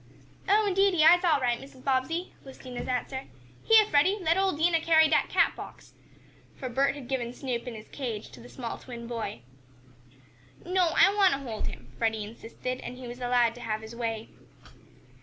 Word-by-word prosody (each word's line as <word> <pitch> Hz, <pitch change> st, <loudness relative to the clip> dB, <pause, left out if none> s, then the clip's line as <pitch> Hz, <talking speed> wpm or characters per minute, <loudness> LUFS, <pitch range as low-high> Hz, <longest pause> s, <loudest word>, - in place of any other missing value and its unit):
"Oh, 425 Hz, +2 st, +4 dB
indeedy 390 Hz, -4 st, +3 dB
I'se 350 Hz, +3 st, +7 dB
all 320 Hz, -5 st, +3 dB
right, 240 Hz, -2 st, 0 dB
Mrs. 265 Hz, -1 st, -14 dB
Bobbsey," 275 Hz, +7 st, -1 dB
was 265 Hz, -1 st, -12 dB
Dinah's 250 Hz, -2 st, -7 dB
answer. 260 Hz, +1 st, -3 dB, 0.4 s
"Heah, 445 Hz, -1 st, +6 dB
Freddie, 370 Hz, +3 st, +3 dB
let 335 Hz, -2 st, +2 dB
ole 385 Hz, 0 st, +2 dB
Dinah 330 Hz, +1 st, +2 dB
carry 320 Hz, -1 st, +5 dB
dat -, -, +2 dB
cat -, -, +2 dB
box," -, -, -11 dB, 0.6 s
for 255 Hz, -, -6 dB
Bert 275 Hz, +3 st, +1 dB
had 275 Hz, -4 st, -9 dB
given 245 Hz, -3 st, -2 dB
Snoop 250 Hz, -2 st, -4 dB
in 240 Hz, -, -5 dB
his 215 Hz, 0 st, -11 dB
cage 235 Hz, -7 st, -5 dB
to -, -, -13 dB
the 240 Hz, -, -13 dB
small 240 Hz, -3 st, -6 dB
twin 235 Hz, -2 st, -9 dB
boy. 230 Hz, -, -5 dB, 1.2 s
"No, 360 Hz, -2 st, +2 dB
I 395 Hz, -, +6 dB
want 395 Hz, -3 st, +4 dB
to 275 Hz, -, -2 dB
hold 220 Hz, -2 st, -4 dB
him," 125 Hz, 0 st, -9 dB
Freddie 220 Hz, -1 st, 0 dB
insisted, 230 Hz, +4 st, -6 dB
and 250 Hz, -, -7 dB
he 255 Hz, -1 st, -8 dB
was 240 Hz, +1 st, -8 dB
allowed 245 Hz, -1 st, +2 dB
to 245 Hz, -, -12 dB
have 215 Hz, -2 st, -3 dB
his 220 Hz, +1 st, -10 dB
way. 225 Hz, -2 st, -4 dB
260 Hz, 190 wpm, -28 LUFS, 235-330 Hz, 1.2 s, I'se